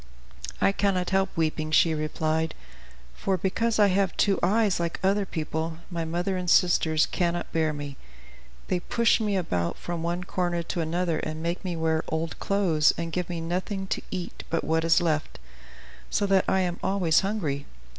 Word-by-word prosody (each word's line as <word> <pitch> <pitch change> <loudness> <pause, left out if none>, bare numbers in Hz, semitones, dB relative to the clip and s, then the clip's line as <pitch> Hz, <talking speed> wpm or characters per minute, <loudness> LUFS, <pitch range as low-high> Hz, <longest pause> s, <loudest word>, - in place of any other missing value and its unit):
"I - - +4
cannot 195 -3 0
help 190 0 +2
weeping," 155 -1 0
she 160 +1 +4
replied; 155 +1 -1 0.6
"for 190 - -1
because 220 +6 0
I 205 -1 +5
have 190 0 +1
two 200 -2 +3
eyes, 205 +1 +2
like 170 -1 -2
other 195 +1 +2
people, 160 0 -3
my 170 -1 -2
mother 175 +4 -1
and 180 -1 -2
sisters 160 -3 +4
cannot 175 -1 -2
bear 160 -1 +1
me; 145 -2 -6 0.7
they 180 - 0
push 235 +7 +2
me 205 -2 +1
about 90 - -1
from 175 -1 -4
one 175 +2 -2
corner 175 -2 -1
to 170 - -3
another 165 0 0
and 155 +1 -4
make 170 +1 -2
me 180 -2 -3
wear 160 -1 +1
their 160 - -4
old 160 +1 -2
clothes, 180 -7 +3
and 165 0 -3
give 180 0 -2
me 170 -1 -3
nothing 185 +4 -2
to - - -1
eat 185 -2 -5
but 165 - 0
what 160 0 +1
is 165 +1 +4
left, 155 -3 -1 0.7
so 205 - +1
that 195 -1 +3
I 190 - +3
am 175 -1 -2
always 190 -5 +3
hungry. 175 -9 -2
175 Hz, 180 wpm, -26 LUFS, 160-190 Hz, 0.7 s, I